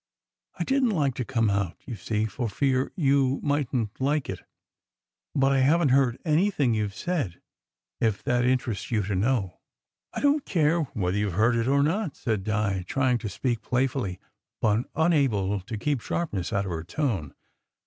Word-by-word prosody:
" - - -32
I - - +1
didn 270 -2 +2
t 210 - 0
like 140 -5 +1
to 125 - -3
come 115 -2 0
out, 100 -4 -1
you 120 - -5
see, 110 0 -1
for 115 +1 -3
fear 130 +4 0
you 140 -4 +2
mightn 140 -5 0
t - - -6
like 145 +1 +1
it; - - -6 1.0
but 135 -1 +3
I 135 - +3
haven 150 +3 +4
t - - +3
heard 130 -3 +3
anything 155 - +2
you 105 -1 0
ve 100 - -9
said, 150 - -2 0.6
if 110 -3 0
that 120 0 +1
in 130 +1 +4
terests 115 -5 -5
you 110 -3 +1
to 100 +2 -2
know." 100 -1 0 0.5
"I - - -4
don 290 +1 +4
t - - -14
care 165 -1 +3 0.2
whether 95 -2 0
you 105 0 0
ve 85 - -6
heard 115 +3 +2
or 140 +1 +3
not," 165 +1 0
said 110 -5 -2
Di, 105 -3 0
trying 130 -3 +1
to 110 - -4
speak 120 +1 -2
playfully, 125 -7 -1 0.4
but 110 +2 +1
unable 135 - +2
to 110 +4 -6
keep 135 +3 -1
sharpness 105 - -2
out 100 -2 0
of 95 - -4
her 80 -1 -3
tone. 95 - -2
125 Hz, 195 wpm, -26 LUFS, 105-145 Hz, 1.0 s, haven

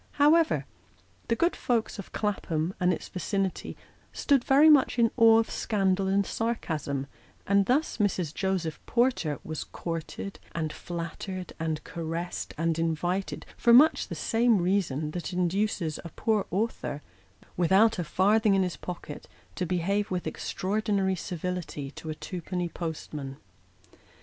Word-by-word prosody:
However, 310 +3 +4 0.6
the 230 - +2
good 340 +8 +2
folks 230 -3 -1
of 200 - -8
Clapham 180 -5 -1
and 180 0 +3
its 175 - -3
vicinity 195 0 -2 0.3
stood 275 -4 +2
very 280 +4 +6
much 290 -5 +5
in 230 -1 +4
awe 225 -2 +7
of 225 - +1
scandal 195 -3 +1
and 195 +1 +2
sarcasm; 155 - -2 0.4
and 200 0 +3
thus 285 +6 +1
Mrs. 185 -7 0
Joseph 185 -5 -2
Porter 235 - +1
was 155 -1 -4
courted, 165 +3 -6 0.2
and 155 -2 -2
flattered, 175 +2 -6
and 160 -1 -2
caressed, 170 +1 -4
and 165 0 0
invited, 175 +4 -1
for 235 - +4
much 300 +6 +6
the - - -5
same 230 -1 +2
reason 175 -5 0
that 175 +2 -5
induces 180 -2 0
a 170 - -7
poor 215 +3 0
author, 195 -7 -2 0.5
without 190 +5 +4
a - - 0
farthing 205 +5 +3
in 190 - +3
his 180 -2 -3
pocket, 175 -4 -7 0.3
to 180 - -3
behave 195 +4 0
with 180 -1 -2
extraordinary 200 -1 -1
civility 175 -5 -4
to 160 - -9
a 155 - -3
twopenny 180 +1 -4
postman. 150 -5 -5
185 Hz, 140 wpm, -28 LUFS, 165-215 Hz, 0.6 s, awe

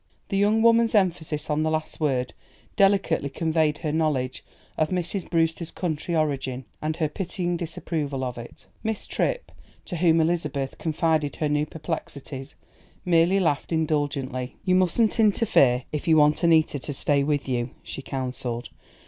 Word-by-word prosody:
The 195 - 0
young 210 +3 +3
woman's 230 0 +4
emphasis 165 -6 +1
on 150 0 0
the 155 - +1
last 155 0 -3
word 130 -5 0 0.4
delicately 195 -7 +3
conveyed 160 0 +1
her 150 - -3
knowledge 150 -5 -1 0.3
of 155 - +1
Mrs. 180 +1 -2
Brewster's 165 0 0
country 170 -1 -3
origin, 135 -4 -1 0.2
and 155 +1 -1
her 160 -2 0
pitying 175 +2 -3
disapproval 155 -5 -3
of 125 -1 -3
it. 120 - -11 0.2
Miss 220 -1 -3
Tripp, - - -2 0.3
to 175 - -5
whom 165 -1 +4
Elizabeth 150 -5 -1
confided 160 -2 0
her 155 - -1
new 150 +1 +1
perplexities, 145 -4 -6 0.5
merely 175 +2 +4
laughed 160 -5 0
indulgently. 145 -5 -1
"You 185 - +3
mustn't 185 +6 +2
interfere, 195 - +4
if 150 +1 -4
you 160 -1 +5
want 150 +2 +4
Annita 160 -3 +4
to 145 - -5
stay 140 +1 +1
with 145 -1 0
you," 120 -1 -1
she - - -6
counselled. 125 -3 -4
155 Hz, 150 wpm, -25 LUFS, 140-175 Hz, 0.5 s, you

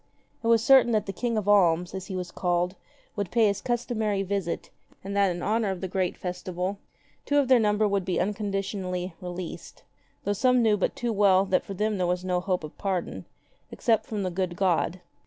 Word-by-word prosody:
It - - -1
was 230 -1 +4
certain 260 -2 +6
that 215 - +1
the 195 - -5
King 235 +3 -1
of 210 -2 -2
Alms, 180 -4 +4
as 190 -1 -6
he 190 - -5
was 180 -1 -4
called, 175 0 0 0.4
would 200 -3 -2
pay 230 +3 +3
his 200 -1 +1
customary 220 -5 -1
visit,^ 195 -3 -3 0.3
and 200 +1 -5
that 200 -1 +4
in 175 -1 -4
honor 220 0 +1
of 190 -2 -3
the 190 - -3
great 185 -1 -1
festival 180 +2 -4 0.4
two 290 - +1
of 280 -2 +3
their 255 -2 +7
number 210 -1 +2
would 200 -1 0
be 185 -1 -1
unconditionally 195 -2 -2
released; 180 -1 -7 0.4
though 205 - 0
some 250 +3 +3
knew 215 -2 +4
but 195 - -1
too 240 -1 -2
well 195 -2 +4
that 190 -1 +1
for 195 - -7
them 210 +1 -1
there 180 - +1
was 180 +1 -1
no 180 -1 +1
hope 180 -2 -1
of 155 - -8
pardon 190 -3 -3 0.2
— - - -39
except 225 -3 +1
from 210 -3 -3
the 185 - -2
good 180 -1 -2
God. 180 -1 +1
195 Hz, 210 wpm, -27 LUFS, 180-215 Hz, 0.4 s, their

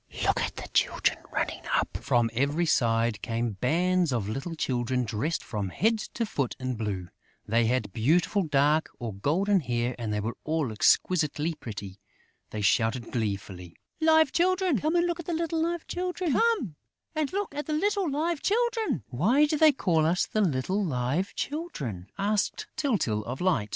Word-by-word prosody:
Look - - +2
at - - -2
the - - -7
children - - +2
running - - -2
up!" - - 0
From 120 -2 +1
every 140 +7 +1
side 115 -6 +2
came 115 0 -1
bands 175 +4 +2
of 115 -6 -1
little 135 +10 -4
children 125 -3 0
dressed 120 +9 -2
from 105 -4 -3
head 220 - +1 0.2
to 235 - 0
foot 140 - -2
in 130 0 -2
blue; 100 -6 -4 0.4
they 115 +1 +2
had 115 -5 0
beautiful 165 - +2
dark 150 -1 +2
or 115 -4 -5
golden 185 - +2
hair 120 -4 -1
and 115 -3 -3
they 105 - 0
were 110 +3 -3
all 155 -6 -1
exquisitely 155 +6 +2
pretty. 100 -8 -8 0.5
They 105 - -4
shouted 115 +4 +1
gleefully: 100 -6 -4 0.2
"Live 315 -2 +5
Children!... 370 -2 +2
Come 310 +3 0
and 345 0 +3
look 345 0 -1
at 340 - -7
the 345 - -1
little 330 0 -1
Live 340 0 -1
Children!" 360 -3 -2 2.8
"Why 230 - +3
do 300 - 0
they 315 -1 +7
call 170 - +1
us 175 +2 +2
the 215 - -1
little 185 +4 0
Live 145 +4 -1
Children?" 140 - -4
asked 205 +1 0
Tyltyl, 155 - 0
of 125 +3 -5
Light. 150 - +1
145 Hz, 150 wpm, -27 LUFS, -, 2.8 s, they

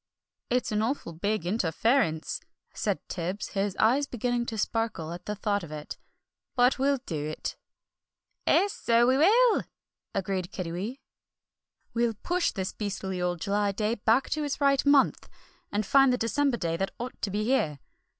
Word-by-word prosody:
"It's 250 -1 0
an 210 0 +1
awful 225 -7 -2
big 200 +2 -1
interference," 180 - +1 0.3
said - - -2
Tibbs, 180 +3 -3
his 195 -1 -1
eyes 265 +6 +3
beginning 245 0 -1
to 225 - -4
sparkle 215 -7 -1
at 175 +1 -10
the 210 - -2
thought 205 0 0
of 160 - -9
it. 150 -1 -6 0.6
"But 250 +1 +4
we'll 280 +1 +3
do 155 -4 -3
it." 155 - -4 0.9
"'Es, 400 +1 +4
so 235 0 +3
we 260 +2 +4
will," 450 +8 +5 0.5
agreed 185 -2 -2
Kiddiwee. 190 +9 -4 0.9
"We'll 235 -1 +1
push 350 - 0
this 190 -1 -3
beastly 195 -3 -3
old 175 -2 -1
July 205 0 +1
day 215 +2 0
back 230 +3 +2
to 305 - 0
its 290 -1 -2
right 275 -1 +3
month, 285 -2 +4 0.4
and 205 +1 0
find 270 +4 +5
the 250 - +2
December 265 +2 +1
day 165 -4 -1
that 195 +2 -1
ought 245 +1 -6
to 205 - -1
be 205 +2 -1
here. 215 - +1
215 Hz, 160 wpm, -28 LUFS, 190-255 Hz, 0.9 s, will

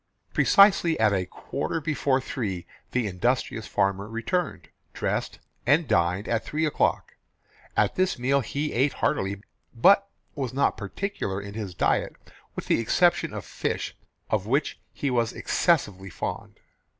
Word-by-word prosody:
Precisely 195 -5 +5
at 105 -2 +4
a 95 -2 0
quarter 165 - -3
before 145 -3 +1
three 100 -9 -4 0.2
the 125 -2 0
industrious 115 +3 -1
farmer 100 0 0
returned, 135 +11 -2 0.2
dressed, - - -2 0.3
and 150 +4 +4
dined 90 -2 +1
at 115 -1 0
three 155 +6 -1
o'clock. 150 - 0 0.6
At - - +3
this 185 0 +1
meal 135 +3 +2
he 145 +4 -3
ate 135 +4 +2
heartily, 100 +1 -1 0.3
but 200 +11 +5 0.2
was 130 -3 -4
not 140 - +2
particular 100 - -4
in 100 0 -8
his 105 -5 -5
diet - - +1 0.4
with - - -5
the - - +2
exception 175 +10 +2
of - - -6
fish, - - -3 0.4
of 105 -2 0
which 140 +5 0
he 140 - -2
was 120 -1 +1
excessively 100 - +1
fond. - - -5
120 Hz, 140 wpm, -26 LUFS, 100-150 Hz, 0.6 s, Precisely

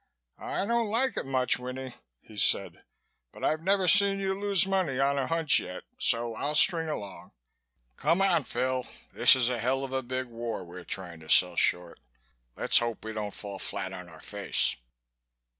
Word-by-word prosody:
"I - - -3
don't 235 0 0
like 250 +5 +1
it - - -4
so - - -8
much, 130 -2 +1
Winnie," 130 0 -6 0.3
he 110 - -16
said, 105 - +1 0.5
"but - - -13
I've 155 0 +1
never 190 +1 +1
seen 200 +1 +5
you 195 -1 -1
lose 200 -1 +2
money 190 -9 0
on 140 +1 +2
a 135 - -1
hunch 165 -4 +3
yet 90 0 -7 0.2
so 115 0 +1
I'll 145 +6 -2
string 165 0 +3
along. 100 -10 -7 0.6
Come 165 +5 +1
on, 180 -7 +2
Phil, 130 +2 -2 0.3
this - - +6
is 125 -2 +1
a 120 - -2
hell 130 +4 0
of 135 -1 -6
a 130 - 0
big 130 +1 -4
war 115 -4 -5
we're 90 +1 -10
trying 90 -3 -6
to 80 -1 -14
sell - - +5
short. 90 -1 0 0.6
Let's - - +4
hope 120 -2 -4
we 110 - -5
don't 105 -1 -3
fall 100 -1 -8
flat 95 0 -4
on 90 -2 -9
our 80 -1 -14
face." 100 +3 0
130 Hz, 190 wpm, -28 LUFS, 110-170 Hz, 0.6 s, this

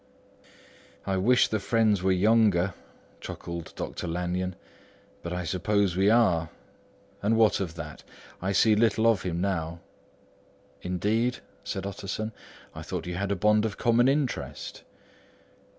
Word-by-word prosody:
"I 95 -1 0
wish 120 +7 +4
the 110 - -1
friends 110 -2 +2
were 95 +1 +2
younger," 100 -2 +3 0.5
chuckled 85 -1 -7
Dr. - - -5
Lanyon. 90 +2 -2 0.7
"But 85 - -6
I 90 0 -2
suppose 95 +2 0
we 95 +2 +3
are. 90 -9 +3 0.7
And 110 +2 +2
what 110 -4 +4
of 85 -4 -4
that? 75 -2 -8 0.4
I 95 +2 -1
see 105 +2 +4
little 110 0 +2
of 115 -4 +4
him 85 -2 -3
now." 85 -3 -2 1.0
"Indeed?" 105 +7 0 0.3
said - - -4
Utterson. 100 +2 -4 0.4
"I - - -8
thought - - -5
you 90 - -4
had 95 +3 -2
a - - +2
bond 105 +3 +3
of 110 -2 -2
common 120 +1 +3
interest." 140 -1 -2
100 Hz, 135 wpm, -27 LUFS, 90-110 Hz, 1.0 s, wish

